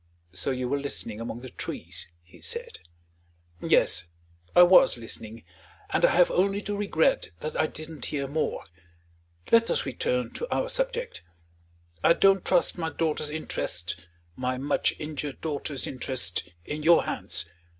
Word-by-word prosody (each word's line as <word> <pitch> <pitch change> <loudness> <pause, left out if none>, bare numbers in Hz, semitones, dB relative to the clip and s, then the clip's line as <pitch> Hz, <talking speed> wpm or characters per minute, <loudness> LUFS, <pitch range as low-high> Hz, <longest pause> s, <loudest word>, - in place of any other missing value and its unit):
"So 90 +8 0
you 130 -1 -1
were 140 +3 0
listening 115 -6 -3
among 115 0 -5
the 130 -1 -9
trees!" - - -4 0.2
he 85 - -19
said. - - -5 0.8
"Yes; 90 - +4 0.5
I 175 - +10
was 180 -7 +6
listening; 115 -1 -6 0.5
and - - +1
I - - +7
have 180 0 +4
only 195 +2 +2
to 205 - -3
regret 200 -6 +1
that 155 - -4
I 155 - +2
didn't 155 -4 -7
hear 140 -2 -2
more. 155 +3 -2 0.9
Let 230 0 +5
us - - +1
return 125 -2 -1
to 480 - -5
our - - 0
subject. - - -2 0.8
I - - +7
don't 195 +1 +4
trust 180 -1 +2
my 165 -1 -1
daughter's 155 -1 -1
interests 90 - -2 0.4
my 130 +2 -2
much 140 +3 +1
injured 150 -2 -5
daughter's 145 -3 -2
interests 120 -9 -2 0.2
in 150 +1 -4
your 165 +2 +6
hands. 85 -1 -1
150 Hz, 150 wpm, -27 LUFS, 125-175 Hz, 0.9 s, I